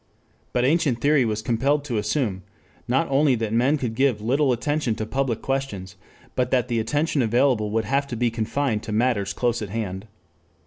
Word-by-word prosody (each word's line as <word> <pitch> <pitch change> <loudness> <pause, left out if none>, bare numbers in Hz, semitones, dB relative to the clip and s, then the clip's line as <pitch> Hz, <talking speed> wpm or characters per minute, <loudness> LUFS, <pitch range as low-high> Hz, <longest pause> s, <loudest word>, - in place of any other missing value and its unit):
But 125 0 +1
ancient 140 -4 +2
theory 145 0 +3
was 110 -1 -2
compelled 135 +5 +1
to 120 -6 -1
assume, 105 -4 -1 0.5
not 130 +7 +1
only 135 -1 +4
that 110 -2 -3
men 130 +6 +3
could 125 -5 -3
give 130 -2 +2
little 135 +6 +1
attention 125 0 0
to 110 - -3
public 125 -1 -2
questions, 105 -8 -3 0.4
but 125 -1 +1
that 125 -1 +1
the 115 -1 +1
attention 145 +5 0
available 120 -1 +2
would 110 +1 0
have 140 +1 0
to 125 - -5
be 120 0 +1
confined 115 +1 -1
to 110 - -7
matters 105 -3 +1
close 120 +2 -1
at 105 - -5
hand. 100 -1 -4
120 Hz, 185 wpm, -24 LUFS, 110-135 Hz, 0.5 s, only